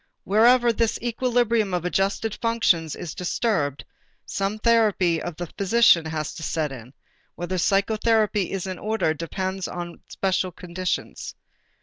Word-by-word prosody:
Wherever 235 +4 +4
this 230 0 0
equilibrium 235 -4 +1
of 175 -1 -3
adjusted 195 +4 0
functions 190 -9 +1
is 170 -3 -6
disturbed, 175 - -1 0.4
some 195 +2 -2
therapy 210 -7 +2
of 175 - -5
the 175 - -4
physician 200 -4 +5
has 155 -2 -3
to - - -9
set 155 -2 -1
in: 125 0 -10 0.4
whether 175 +1 -3
psychotherapy 210 +1 +2
is 195 -1 -3
in 185 -2 -5
order 215 -7 0
depends 185 +4 -4
upon 175 -1 -5
the - - -17
special 185 -1 -1
conditions. 180 +1 -4
190 Hz, 135 wpm, -24 LUFS, 170-225 Hz, 0.4 s, physician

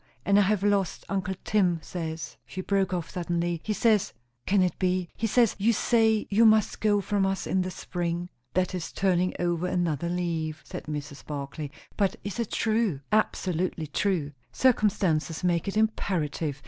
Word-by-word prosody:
And 200 0 +5
I - - +6
have 200 0 +2
lost 200 -3 +1
uncle 190 -1 -1
Tim 185 -5 +2
says," 160 -2 -5
she 185 - -5
broke 195 -1 +1
off 175 -3 -3
suddenly, 170 -1 -1
"he 215 - -2
says, 215 -1 +2 0.3
can 195 -1 +4
it 180 - -1
be? 185 -2 0
he 225 - -1
says 235 0 +3
you 220 +4 +4
say 220 -1 +3
you 215 +3 +5
must 220 -2 +4
go 205 -1 +3
from 200 0 0
us 195 0 0
in 190 - +1
the 185 - -2
spring?" 175 -1 -3 0.3
"That 185 0 +1
is 180 -3 -4
turning 185 -2 +1
over 175 0 0
another 170 -3 0
leaf," 165 -3 -2
said - - -7
Mrs. 150 -1 -6
Barclay. 145 0 -5 0.3
"But 195 -2 +2
is 205 +3 -5
it 230 - -1
true?" 220 -10 0
"Absolutely 185 -5 0
true. 155 -1 0 0.2
Circumstances 190 -10 +2
make 175 0 +1
it 195 - -2
imperative. 165 -9 0
185 Hz, 170 wpm, -27 LUFS, 170-205 Hz, 0.3 s, I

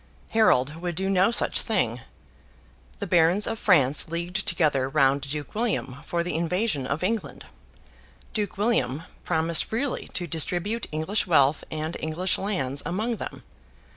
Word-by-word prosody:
Harold 155 - +3
would 175 -1 -3
do 190 +3 -1
no 190 +1 +4
such 235 - +1
thing. - - 0 1.0
The 200 - -4
barons 175 +2 +3
of 225 0 -3
France 150 -8 +3
leagued 175 +4 -3
together 140 -6 +1
round 140 -1 +3
Duke 145 +2 -5
William 210 - -1
for 170 0 0
the 175 - -3
invasion 170 - 0
of 145 +5 -2
England. 220 +2 -2 0.9
Duke 210 -1 -2
William 165 - +1 0.2
promised 160 +1 +2
freely 250 +5 -3
to 175 - -2
distribute 175 +7 -1
English 160 +8 0
wealth 145 -3 +3
and 155 +1 -3
English 165 +4 0
lands 140 -9 -2
among 220 +6 -2
them. - - -7
170 Hz, 140 wpm, -26 LUFS, 150-200 Hz, 1.0 s, no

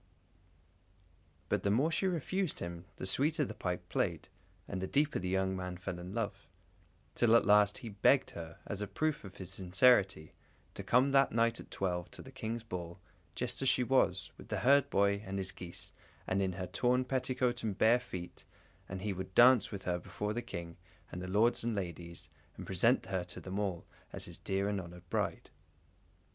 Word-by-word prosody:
But - - 0
the 100 - 0
more 135 +11 +3
she 190 - +1
refused 185 0 -1
him 85 0 -6
the - - -6
sweeter 145 +9 +2
the - - -6
pipe 90 -1 -3
played, - - -1 0.4
and 95 -2 -4
the 95 - -2
deeper 145 +6 +1
the 90 0 -3
young 95 0 +1
man 90 -1 -4
fell 90 0 -5
in 90 +1 -7
love; 105 -3 -3 0.7
till 115 -1 +4
at 115 - +5
last 105 0 +5
he - - -4
begged 110 +7 +3
her, 80 -1 -8
as 100 0 -5
a 105 - -2
proof 155 +7 -1
of 95 -2 -10
his 95 -1 -6
sincerity, 95 -3 +3 0.4
to - - -6
come 130 +3 +3
that 135 0 +5
night 115 0 +2
at - - -11
twelve 90 -2 -2
to - - -11
the - - -11
King's 115 +1 -4
ball, 90 -4 -6 0.4
just 125 +1 -1
as 135 - +4
she 125 - +3
was, 120 -7 +2
with - - -11
the - - -2
herdboy 100 -7 +4
and 95 0 -4
his 95 -1 -2
geese, 85 -1 -8 0.3
and 95 +1 0
in 95 -1 0
her 90 0 -4
torn 125 +5 +1
petticoat 130 -2 0
and 105 -3 -2
bare 115 +4 +5
feet, 90 -8 -8 0.5
and 95 0 -5
he 105 -2 -1
would 95 0 -7
dance 120 -3 +7
with 100 -2 -6
her 90 -1 -1
before 105 +4 -4
the 120 - -2
King 85 -6 -7 0.3
and 90 - -5
the 90 - -5
lords 110 +6 +2
and 115 -1 -1
ladies, 85 -3 -5 0.3
and - - -7
present 115 +7 +3
her 95 -1 -2
to 90 - -8
them 95 +2 -4
all, 95 -5 -2 0.3
as - - -5
his - - -9
dear 95 +1 -1
and 100 -2 -1
honoured 90 0 -12
bride. - - -2
100 Hz, 195 wpm, -33 LUFS, 90-120 Hz, 0.7 s, dance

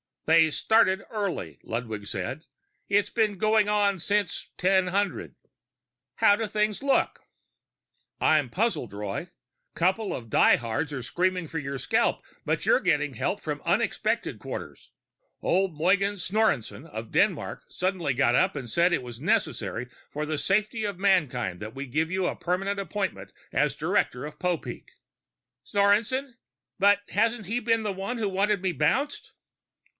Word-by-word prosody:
"They 160 0 +5
started 195 +2 +3
early," 185 - -3
Ludwig 110 -3 -5
said. 120 - -4 0.4
"It's 205 0 +2
been 215 -3 +1
going 215 +1 +3
on 205 -2 +2
since 205 +3 -1
1000." 190 +2 +1 0.8
"How 205 - +5
do 225 0 -2
things 210 0 0
look?" 275 0 +1 1.0
"I'm 150 -5 +3
puzzled, 190 - -1
Roy. 105 - -4 0.5
Couple 190 +5 +1
of 115 -2 -8
die - - +6
hards 120 +6 -3
are 130 -3 -4
screaming 180 +5 0
for 160 +1 -4
your 140 -1 -4
scalp, - - +1 0.2
but - - -1
you're - - +5
getting - - +1
help - - -1
from - - -4
unexpected - - 0
quarters. - - -7 0.5
Old 185 -3 +1
Mogens 190 +2 +2
Snorreson 185 - 0
of 110 +1 -7
Denmark - - 0
suddenly 180 -6 -1
got 125 -2 +3
up 125 - +3
and 130 -4 -5
said 170 +8 +3
it 130 - 0
was 120 -2 -9
necessary 125 - -1 0.2
for 150 +1 -3
the 155 0 -2
safety 215 - 0
of 200 -3 -3
mankind 140 - +1
that 110 +3 -7
we 135 +1 -4
give 155 +5 -1
you 185 +1 0
a - - -1
permanent 195 +3 -1
appointment 195 +1 -4 0.2
as - - +1
director 125 +3 0
of 150 0 -9
Popeek." 180 -3 -3 0.7
"Snorreson? 225 - +1 0.4
But 200 +1 +5
hasn't 225 0 +1
he 230 +4 0
been 225 -1 +1
the 210 -2 -1
one 195 +6 -4
who 215 -3 -1
wanted 200 +1 +1
me 190 - +1
bounced?" 175 - 0
185 Hz, 150 wpm, -27 LUFS, 140-205 Hz, 1.0 s, die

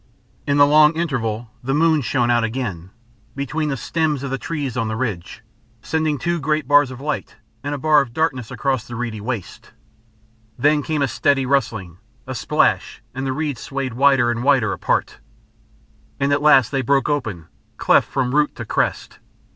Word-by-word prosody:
In 140 0 +2
the 145 - +7
long 150 +2 +5
interval 120 -9 -2
the 135 +3 -1
moon 160 -1 +3
shone 120 0 +1
out 120 -1 +2
again, 110 -7 -4 0.5
between 150 +3 -2
the 135 - -2
stems 150 +2 -1
of 140 - -4
the 135 - -2
trees 145 -6 -4
on 115 -3 -1
the 110 - -3
ridge, 110 -3 -4 0.4
sending 155 -1 0
two 170 +6 -1
great 155 -1 -1
bars 145 -1 +5
of 130 -1 -9
light 150 +1 -4 0.3
and 145 +1 -2
a - - -4
bar 150 +1 +4
of 130 -4 -5
darkness 130 -4 -1
across 135 -5 -1
the 120 - -7
reedy 115 -3 -4
waste. 115 -4 -6 0.8
Then 150 +1 +3
came 155 -1 -1
a - - +2
steady 140 0 +1
rustling, 110 -10 -1 0.3
a 130 - -5
splash, 120 - 0
and 135 +1 -4
the - - 0
reeds 145 -3 -3
swayed 135 -3 -4
wider 135 -1 +3
and 120 0 -3
wider 135 -6 +3
apart. - - -1 1.0
And 140 +1 +1
at 145 - +1
last 135 -6 +5
they 135 -2 0
broke 135 +2 +1
open, 110 - -2 0.3
cleft - - +3
from 130 -2 -1
root 150 0 +2
to - - -6
crest.... - - -2
135 Hz, 180 wpm, -20 LUFS, 120-145 Hz, 1.0 s, the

